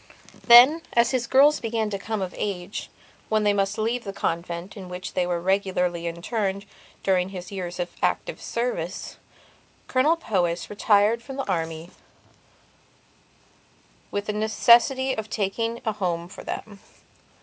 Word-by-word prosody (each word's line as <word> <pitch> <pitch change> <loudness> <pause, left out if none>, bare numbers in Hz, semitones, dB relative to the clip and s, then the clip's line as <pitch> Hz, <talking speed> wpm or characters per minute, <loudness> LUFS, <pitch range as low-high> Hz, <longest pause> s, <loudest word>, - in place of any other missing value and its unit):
Then, 255 +7 +9
as 235 0 +3
his 250 -3 -1
girls 285 +4 +5
began 225 -2 -2
to 200 - -3
come 215 -1 -3
of 185 - -5
age 195 -1 -4 0.4
when 215 -1 +2
they 205 -1 +3
must 200 +1 0
leave 230 +2 -1
the 195 - -5
convent 170 0 -3
in 190 -3 -9
which 180 0 -6
they 180 -1 0
were 175 -1 -1
regularly 180 -2 0
interned 195 +3 -3 0.4
during 185 -1 +2
his 180 -1 -8
years 180 -3 -5
of 175 0 -3
active - - -1
service, 235 -7 -3 0.7
Colonel 280 +6 +3
Powys 180 - -1
retired 210 +2 +3
from 270 +2 -9
the 275 - -4
army 165 -2 -3 2.2
with 205 0 -3
the 210 - -2
necessity 235 +5 +4
of 220 -3 -5
making 225 +3 -2
a 220 - +1
home 175 -5 -2
for 180 - -11
them. 205 -2 -6
205 Hz, 145 wpm, -25 LUFS, 180-230 Hz, 2.2 s, Then